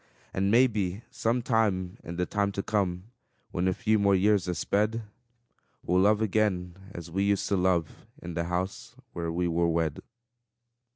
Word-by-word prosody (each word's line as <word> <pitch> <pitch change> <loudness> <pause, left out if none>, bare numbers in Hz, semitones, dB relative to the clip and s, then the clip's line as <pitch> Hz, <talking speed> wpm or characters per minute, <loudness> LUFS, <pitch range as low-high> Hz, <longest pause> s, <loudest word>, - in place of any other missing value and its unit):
And 95 +1 +1
maybe 105 -4 +2
some 115 +2 0
time 100 -7 0
in 85 - -6
the 90 +1 0
time 100 +1 0
to 100 - -3
come, 95 0 -1 0.4
When 90 +1 0
a 95 - +2
few 110 -2 +2
more 100 -1 +4
years 100 -1 +2
are 90 - -1
sped, 105 +6 0 0.8
We'll 90 +1 +2
love 105 +2 +4
again 95 -4 0 0.2
as 85 -3 -8
we 95 +3 0
used 100 -1 +1
to 100 - +2
love, 90 -3 0
In 85 - -7
the 85 0 -1
house 90 +3 -3 0.2
where 85 -1 -3
we 90 +1 0
were 85 0 +1
wed. 80 -2 0
95 Hz, 170 wpm, -28 LUFS, 90-105 Hz, 0.8 s, more